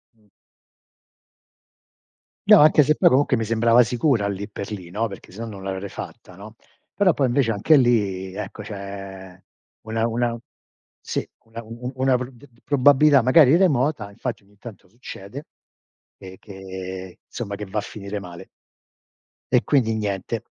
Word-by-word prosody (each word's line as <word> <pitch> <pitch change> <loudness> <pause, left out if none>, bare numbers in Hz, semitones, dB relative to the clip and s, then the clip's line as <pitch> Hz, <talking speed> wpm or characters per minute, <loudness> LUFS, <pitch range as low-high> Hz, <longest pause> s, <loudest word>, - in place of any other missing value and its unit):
Mh. 105 -2 -31 2.2
No, - - +8
anche 150 0 +6
se 155 +2 +2
poi - - +4
comunque 130 -1 +3
mi 115 - -2
sembrava 115 +2 +4
sicura 120 -3 +1
lì 100 +1 -5
per 100 0 -7
lì, 95 -5 -7
no, 110 +5 -2
perché 95 -3 -12
sennò 115 +5 -7
non 100 -3 -9
l'avrei 95 +1 -4
fatta, 90 -1 -10
no. 110 +3 -12 0.4
Però 190 -5 +3
poi 135 -3 +1
invece 120 -2 +1
anche 115 +9 +4
lì, 100 -7 +1
ecco 105 +1 -7
c'è 95 -2 -9 0.4
una 110 +1 -1
una 120 0 -1 0.6
sì, - - -4 0.2
una 115 +1 -9
u 110 - -17 0.2
u 125 - -3
una 130 -1 +2
pr 125 +1 -5
d 125 +3 -17
d 115 - -28
probabilità 145 0 +4
magari 135 +4 +6
remota, 140 - +1
infatti 115 0 -6
ogni 100 0 -26
tanto 105 -4 -12
succede 120 - -10 0.7
e 95 -1 -12
che 95 -2 -9
somma 100 -4 -6
che 105 - -7
va 100 +3 -6
a - - -3
finire 100 0 -7
male. 90 -3 -11 1.0
E - - +4
quindi 120 -6 +2
niente. 100 -3 -3
110 Hz, 160 wpm, -22 LUFS, 100-125 Hz, 2.2 s, No